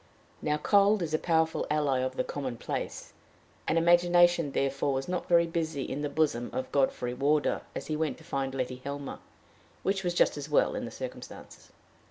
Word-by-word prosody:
Now 150 0 0
cold 200 +4 +4
is 155 -2 -4
a 155 - +2
powerful 160 -1 +1
ally 145 -3 +1
of 130 0 -2
the - - +1
commonplace, 130 -5 -5 0.5
and 160 - +2
imagination 175 -1 +4
therefore 135 +1 0
was 135 0 -2
not 180 0 -3
very 170 -1 +5
busy 160 -4 -2
in 140 - -4
the 145 - -1
bosom 140 -6 0
of 130 - -3
Godfrey 130 -3 +1
Wardour 145 +4 +1
as - - -4
he 155 - -2
went 155 -2 -1
to 160 - -16
find 135 -5 -3
Letty 125 -1 -3
Helmer, 140 0 -5 0.6
which 195 0 0
was 175 -1 -1
just - - +3
as 145 +1 -6
well, 150 - +3
in - - -3
the - - -6
circumstances. - - -9
150 Hz, 185 wpm, -29 LUFS, 135-170 Hz, 0.6 s, very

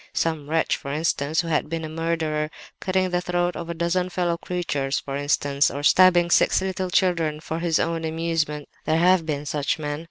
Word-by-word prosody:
Some 155 -3 -1
wretch, 160 0 +1
for 140 - -7
instance, 155 0 0
who 170 - -7
had 155 -2 0
been 165 0 -3
a - - -6
murderer—cutting 165 +3 -2
the 180 0 +1
throat 175 0 -1
of 170 0 -6
a 170 - -3
dozen 175 +2 0
fellow 175 -1 0
creatures, 160 -6 -2
for 135 - -6
instance; 145 0 +1
or 145 +1 -5
stabbing 175 +1 +5
six - - +4
little 190 -1 -3
children 170 -5 +1
for 160 +1 -4
his 170 -2 +1
own 165 0 -1
amusement 160 -2 -2 0.2
(there 155 - +2
have 175 -1 +3
been 145 -1 -2
such 145 +1 -1
men!) 145 -1 -4
165 Hz, 190 wpm, -24 LUFS, 150-175 Hz, 0.2 s, stabbing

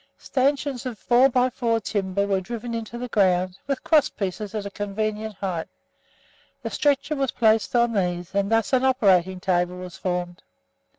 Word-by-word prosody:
Stanchions 270 -1 -1
of 240 -4 -6
4 250 +5 +4
x 250 0 +1
4 230 -2 +2
in. 225 - -1
timber 200 -1 -1
were 195 -1 0
driven 235 +4 -6
into 230 0 -5
the 250 +1 -4
ground, 185 -4 +1
with 275 -2 -2
crosspieces 215 - 0
at 210 -2 -3
a 200 - -5
convenient 215 +1 -3
height; 185 -4 -3 1.0
the - - -4
stretcher 290 +1 +1
was 270 -2 0
placed 220 0 +2
on 240 -1 +3
these, 180 -3 -1
and 200 +1 0
thus 225 +2 +1
an 260 0 +4
operating 190 -8 +3
table 180 -1 0
was 180 -1 -8
formed. 180 0 -3
215 Hz, 170 wpm, -24 LUFS, 190-245 Hz, 1.0 s, 4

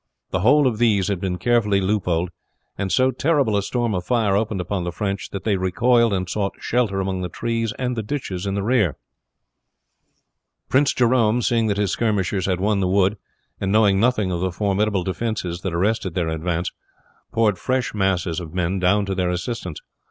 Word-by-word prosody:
The 95 - 0
whole 140 +9 +4
of 115 -4 0
these 105 -5 +2
had 95 -3 -2
been 90 -2 -2
carefully 105 -1 +2
loopholed, 90 -3 0 0.4
and 95 -1 -3
so 130 +1 +3
terrible 135 -4 +1
a 100 - +2
storm 120 +2 -1
of 90 -2 -2
fire 110 -3 +1
opened 105 -1 0
upon 90 +1 -2
the 85 - -3
French 100 +2 -3
that 100 - -6
they 105 -3 +1
recoiled 115 +5 +2
and 95 -2 -1
sought 100 +1 -2
shelter 110 -5 0
among 95 -1 -2
the 90 - -3
trees 115 +2 -2
and 125 -1 -2
ditches 100 -9 -3
in 100 - -1
the 100 - -1
rear. 105 - +2 2.0
Jerome, 120 -1 +3
seeing 115 -1 +2
that 100 -1 0
his 100 -2 +1
skirmishers 100 -4 0
had 90 -2 0
won 100 +1 +1
the 95 - +1
wood, 95 +2 +2 0.4
and 95 - -1
knowing 105 -2 +4
nothing 110 -4 +2
of 85 -1 -2
the 95 0 0
formidable 100 +1 0
defenses 95 -3 -3
that 95 - -3
arrested 95 +1 0
their 85 -3 0
advance, 85 +2 -2 0.6
poured 105 -4 +2
fresh 130 0 -1
masses 95 -5 0
of 85 -1 -9
men 90 +1 0
down 100 +3 +2
to 100 - -2
their 90 -1 0
assistance. 90 -1 -4
100 Hz, 185 wpm, -22 LUFS, 90-115 Hz, 2.0 s, whole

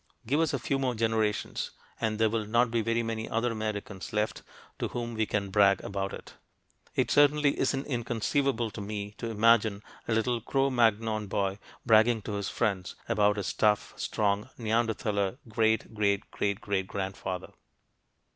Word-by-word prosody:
Give 140 +7 +1
us 165 -2 +2
a 140 - 0
few 135 +2 -1
more 130 -2 0
generations 110 -2 0 0.3
and 110 -2 0
there 110 0 +4
will 110 -1 -1
not 120 +2 +3
be 115 -1 +1
very 115 +1 0
many 115 -1 -3
other 115 +2 0
Americans 105 -3 -4
left 105 +1 -1 0.4
to - - 0
whom 120 -1 -4
we 110 -1 0
can 100 -2 -1
brag 100 -2 +5
about 100 -1 -3
it. - - -9 0.6
It - - +1
certainly 145 0 +4
isn't 135 0 0
inconceivable 120 -1 0
to 105 - -7
me 100 0 -4
to 115 - -3
imagine 110 -2 +3 0.2
a 115 - +1
little 115 +1 +1
Cro 135 +4 +1
Magnon 110 -3 +2
boy 100 0 -1 0.3
bragging 110 -1 +5
to 105 - -5
his 100 -1 -2
friends 100 -5 -1
about 105 0 +3
his 100 - -2
tough, 105 -1 +2
strong, 105 +2 0
Neanderthaler 110 -2 0
great 110 0 +1
great 100 -2 0
great 100 0 -1
great 100 -3 -1
grandfather! 95 -2 -4
110 Hz, 165 wpm, -29 LUFS, 105-115 Hz, 0.6 s, brag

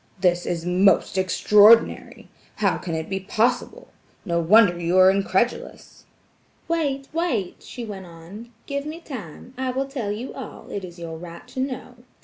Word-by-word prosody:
"This 175 -1 +1
is 170 -1 -3
most 185 +3 +3
extraordinary! 210 +4 +4 0.3
How - - +1
can 165 -3 -4
it 160 0 -4
be 190 0 -3
possible?" 240 - -1 0.4
No 170 -3 0
wonder 180 +1 +5
you 170 +2 0
are 185 0 +7
incredulous. 195 +4 -2 0.6
"Wait, 285 -5 -1
wait!" 310 - -2
she 245 -2 -8
went 195 -4 -8
on, 175 +8 -12 0.2
"give 280 0 -4
me 315 +2 -6
time. 250 - -9
I 260 -1 -1
will 265 +2 -1
tell 250 -7 -4
you 225 +5 -5
all; - - -9
it 200 - -4
is 175 -1 -9
your 165 -1 -7
right 170 0 -10
to - - -7
know. 255 -1 -4
205 Hz, 160 wpm, -23 LUFS, 175-255 Hz, 0.6 s, are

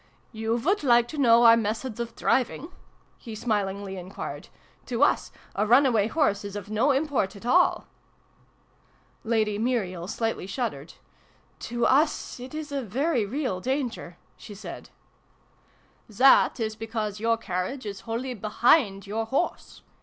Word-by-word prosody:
" - - -37
You 225 +1 0
would 355 - 0
like 240 -4 +4
to 305 - -6
know 235 -3 +6
our 230 -1 +8
methods 225 +2 -3
of 235 -1 -5
driving?" 265 +4 0 0.5
he 225 -3 -8
smilingly 200 -3 -2
enquired. 185 +2 -7 0.4
"To 250 +2 +1
us, - - +2 0.2
a 210 +2 0
run 250 +6 +6
away 220 -5 +2
horse 225 -8 +1
is 200 0 -7
of 205 0 -7
no 225 +7 +2
import 275 -9 0
at 200 - -12
all! 350 +9 +3 0.7
" - - -37
Lady 215 -2 +1
Muriel 195 -8 -1
slightly 225 -3 -3
shuddered. 195 - -4 0.3
" - - -35
To 240 0 0
us 290 -1 +1
it 255 +4 -9
is 310 -1 -6
a 280 -1 -2
very 250 - -1
real 255 -5 -2
danger," 245 -7 -3 0.2
she 205 - -11
said. 200 - -9 0.6
" - - -36
That 265 -1 +6
is 220 -1 -2
because 220 -2 -4
your 230 +1 +1
carriage 205 +5 -4
is 200 -2 -6
wholly 250 +3 -3
behind 215 -1 +2
your 220 +2 -3
horse. 275 +8 -3
230 Hz, 155 wpm, -26 LUFS, 205-260 Hz, 0.7 s, our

